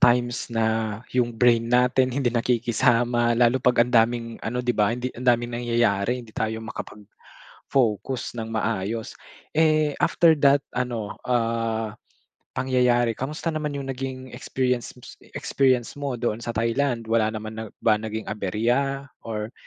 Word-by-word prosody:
times 120 0 +3
na 115 -1 0 0.5
yung 125 -1 +2
brain 115 -1 +3
natin 125 +1 +3
hindi 130 -2 0
nakikisama, 120 0 +2
lalo 120 +2 +3
'pag 125 -1 +4
ang 125 - -7
daming 115 0 +3
ano 125 +2 -3
di 120 - +2
ba, 105 -3 +2
hindi 125 +2 -3
ang 125 +1 -3
daming 120 0 +2
nangyayari 120 -2 +1
hindi 110 - -17
tayo 110 0 -3 0.8
makapag-focus 120 0 -1
ng 115 -1 -5
maayos. 110 0 -2 0.4
Eh, 155 -2 +3
after 165 -2 +4
that, 140 0 +6 0.2
ano, 120 -4 -2
ah, 115 -2 -1 0.6
pangyayari 125 -2 +2
kamusta 150 +7 -3
naman 150 -2 -3
yung 135 -1 -4
naging 130 0 -6
experience 125 -1 -2 0.4
experience 130 -3 +1
mo 140 -3 -2
doon 120 -1 -2
sa 115 -2 -5
Thailand? 115 +1 0
Wala 110 -1 +2
naman 110 0 -5
na - - -4 0.2
ba 105 -1 +4
naging 110 0 -4
aberya? 120 +7 0 0.2
Or 110 0 -5
120 Hz, 140 wpm, -24 LUFS, 115-130 Hz, 0.8 s, that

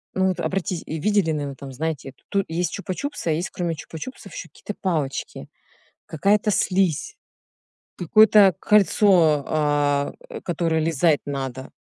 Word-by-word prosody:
ну 190 0 +2
вот, 185 - -1
обратите 185 -2 -2
и 160 0 -5
видели, 205 -3 +2
наверно, 145 -3 -3
там, 135 -1 -9
знаете, 145 -2 -4 0.2
ту 195 -1 +1
есть 170 +2 -2
"Чупа-чупсы", 200 +4 -5
а - - +3
есть, 165 +4 -2
кроме 170 -2 -2
"Чупа-чупсов", 160 +10 -9
еще - - -7
какие-то 210 - -8
палочки, 155 -8 -3 0.6
какая-то 205 +6 +1
слизь, 190 - 0 0.8
какое-то 205 +1 +6
кольцо, 185 -8 +4
а, 145 -2 +1 0.2
э, 475 - -8
которое 165 -2 0
лизать 160 -1 +2
надо. 135 -2 -5
165 Hz, 135 wpm, -23 LUFS, 150-195 Hz, 0.8 s, какое-то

